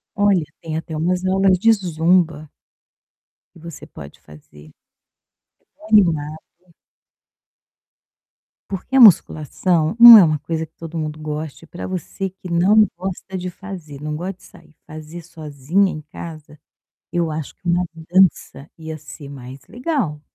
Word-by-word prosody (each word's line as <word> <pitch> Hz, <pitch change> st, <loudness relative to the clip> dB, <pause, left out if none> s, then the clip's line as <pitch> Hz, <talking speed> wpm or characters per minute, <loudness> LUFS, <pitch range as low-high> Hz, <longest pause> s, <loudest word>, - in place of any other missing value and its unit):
Olha, 200 Hz, -5 st, +2 dB, 0.2 s
tem 160 Hz, -2 st, -5 dB
até 160 Hz, 0 st, -6 dB
umas 180 Hz, +3 st, -1 dB
aulas 190 Hz, 0 st, +2 dB
de 225 Hz, +5 st, +3 dB
zumba. 165 Hz, -5 st, 0 dB, 1.1 s
Que -, -, -16 dB
você 165 Hz, -1 st, -11 dB
pode 70 Hz, -, -13 dB
fazer. 75 Hz, 0 st, -17 dB, 1.1 s
É -, -, -42 dB
tão 215 Hz, -, -14 dB
animado. 160 Hz, -7 st, +2 dB, 2.3 s
Porque 200 Hz, +7 st, -4 dB
a -, -, +6 dB
musculação 170 Hz, -, +3 dB
não 235 Hz, -1 st, +12 dB
é 195 Hz, -, +8 dB
uma 155 Hz, -2 st, 0 dB
coisa 160 Hz, +1 st, -4 dB
que 160 Hz, -, -40 dB
todo 165 Hz, 0 st, -8 dB
mundo 155 Hz, 0 st, -5 dB
goste, 155 Hz, +1 st, -6 dB
pra 175 Hz, -, -8 dB
você 185 Hz, +1 st, -5 dB
que 185 Hz, -1 st, -12 dB
não 200 Hz, +6 st, +4 dB
gosta 190 Hz, +1 st, -6 dB
de 180 Hz, 0 st, -5 dB
fazer, 175 Hz, -7 st, -10 dB
não 150 Hz, 0 st, -5 dB
gosta 185 Hz, +4 st, -5 dB
de -, -, -21 dB
sair, 155 Hz, -, -19 dB
fazer 155 Hz, +2 st, -10 dB
sozinha 155 Hz, +5 st, -2 dB
em 155 Hz, -, -7 dB
casa, 155 Hz, -1 st, -11 dB, 0.5 s
eu 170 Hz, -2 st, -1 dB
acho 155 Hz, -2 st, -6 dB
que -, -, -49 dB
uma 175 Hz, +1 st, +1 dB, 0.3 s
dança 180 Hz, -5 st, +1 dB
ia 160 Hz, -1 st, -8 dB
ser 150 Hz, -1 st, -12 dB
mais 135 Hz, -1 st, -10 dB
legal. 245 Hz, -, -3 dB
165 Hz, 145 wpm, -19 LUFS, 155-185 Hz, 2.3 s, não